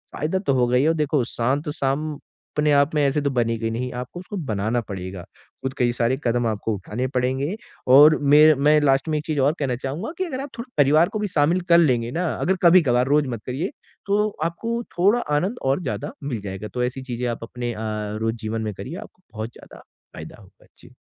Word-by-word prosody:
फ़ायदा 160 +5 -1
तो 165 -8 0
होगा 125 -1 +2
ही। 135 - +3
और 165 - +4
देखो, 150 -3 +1
शांत 135 +8 -1
शाम 140 +3 -1
अपने 150 +1 -3
आप 140 +2 +3
में 150 - +3
ऐसे 145 +2 0
तो 140 - 0
बनेगी 115 -2 0
नहीं, 125 +2 -3
आपको 125 +8 -8
उसको 195 +2 -7
बनाना 110 +4 0
पड़ेगा, 95 -4 -7
ख़ुद 130 +8 -9
कई 120 -1 +3
सारे 120 +2 0
कदम 120 0 +1
आपको 110 0 -2
उठाने 105 +6 -4
पड़ेंगे। 130 +7 0 0.4
और 150 +2 +8
में 150 +2 +7
मैं 150 +2 +4
लास्ट 135 +1 +2
में 155 - +1
एक 150 - -9
चीज़ 155 -3 -1
और 140 +3 +3
कहना 135 -4 0
चाहूँगा 155 - -4
कि 375 - 0
अगर 265 -6 -4
आप 280 - -6
थोड़ा 245 +1 -7
परिवार 155 +5 +4
को 215 - -4
भी 210 - -1
शामिल 165 +5 +3
कर - - +8
लेंगे 125 -8 +2
ना, 175 +4 -1
अगर 190 - 0
कभी-कभार, 140 -8 +5
रोज़ 145 0 +3
मत 105 - -11
करिए, 145 +10 -2 0.4
तो 210 +1 +2 0.2
आपको 230 +8 -2 0.2
थोड़ा 205 +7 +4 0.2
आनंद 195 +10 -1
और 135 +6 +1
ज़्यादा 145 - -4
मिल 125 -7 -3
जाएगा। 100 +1 -6
तो 125 -1 -1
ऐसी 125 +2 -3
चीज़ें 125 -1 -4
आप 115 -1 -5
अपने 120 +1 -4
अ, 105 - -8 0.4
रोज़ 115 +1 0
जीवन 110 0 -4
में 105 -2 -3
करिए, 130 - -7
आपको 185 - -12
बहुत 110 +1 -4
ज़्यादा - - -14 0.3
फ़ायदा - - -10
होगा। - - -21
जी। - - -17
135 Hz, 215 wpm, -23 LUFS, 120-155 Hz, 0.4 s, और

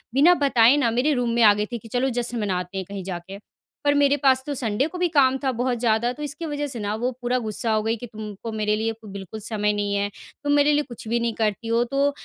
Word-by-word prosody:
बिना 325 +6 +7
बताए 265 -4 +4
ना, 235 -5 +2
मेरे 255 +6 +2
रूम 245 -3 0
में 235 - +2
आ 210 -1 +8
गई 210 0 -1
थी 240 - -2
कि, 225 - -13
"चलो, 250 +4 0
जश्न 240 -1 -2
मनाते 185 -1 -2
हैं 190 - -3
कहीं 200 -2 -5
जाके।" 185 +1 -6 0.5
पर 285 - +4
मेरे 285 0 +4
पास 260 -1 +4
तो 290 - -1
संडे 240 +3 0
को 360 - -8
भी 360 - +3
काम 270 -4 +4
था 265 - +2
बहुत 245 0 -1
ज़्यादा, 235 +1 +2
तो 300 +3 -8
इसकी 295 +3 -3
वज़ह 290 -1 -3
से 250 -4 -5
ना, 205 0 -2
वो 245 +3 -1
पूरा 245 +1 0
गुस्सा 220 +1 -2
हो 215 0 +1
गई 225 +1 0
कि, 245 - -8
"तुमको 215 0 -7
मेरे 210 -1 0
लिए 225 +1 -1
को 220 -1 -15
बिल्कुल 200 +2 -7
समय 210 -1 -1
नहीं 205 -1 -1
है। 200 0 0 0.4
तुम 290 - +2
मेरे 290 +1 +4
लिए 295 0 +2
कुछ 230 -2 -10
भी 235 +2 +1
नहीं 235 -1 -1
करती 220 +1 -1
हो, 230 +1 +2
तो 275 +3 +1
235 Hz, 270 wpm, -24 LUFS, 210-270 Hz, 0.5 s, आ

